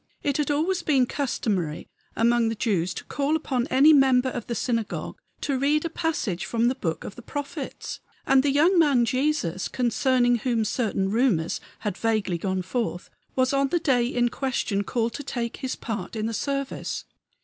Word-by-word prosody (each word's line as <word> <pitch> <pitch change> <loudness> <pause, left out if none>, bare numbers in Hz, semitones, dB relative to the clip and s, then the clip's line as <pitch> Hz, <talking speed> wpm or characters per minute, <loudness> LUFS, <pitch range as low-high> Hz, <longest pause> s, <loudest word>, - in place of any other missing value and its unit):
It 280 -1 +1
had 300 -1 0
always 325 +6 +1
been 270 -4 +3
customary 205 - -2 0.3
among 235 0 +3
the 225 - -2
Jews 185 -6 0
to - - -6
call 285 +2 0
upon 260 -5 -1
any 280 +4 +6
member 265 -2 +4
of 245 -3 -5
the 235 - -2
synagogue 230 -3 -2 0.2
to 275 -3 -1
read 300 +3 +2
a 330 - -2
passage 275 - -1
from 235 +1 +1
the - - +1
book 165 -11 -3
of - - -7
the - - -10
prophets; 285 +2 -6 0.3
and 270 -1 +5
the 285 - +1
young 325 +6 +4
man 280 -7 +4
Jesus, 255 - 0
concerning 245 0 +2
whom 230 -1 0
certain 200 -5 0
rumors 220 -8 +1 0.2
had 205 -4 -3
vaguely 215 -6 0
gone 185 +1 -1
forth, 205 -2 -3 0.2
was 260 +1 +2
on 275 0 +3
the 345 - +1
day 255 -7 +2
in 240 -1 +1
question 235 -6 -1
called 230 +1 -1
to 290 - -5
take 240 -3 -3
his 260 -2 -3
part 205 -3 -5
in 215 -1 -2
the 225 - -2
service. 275 +4 -3
245 Hz, 180 wpm, -25 LUFS, 225-275 Hz, 0.3 s, any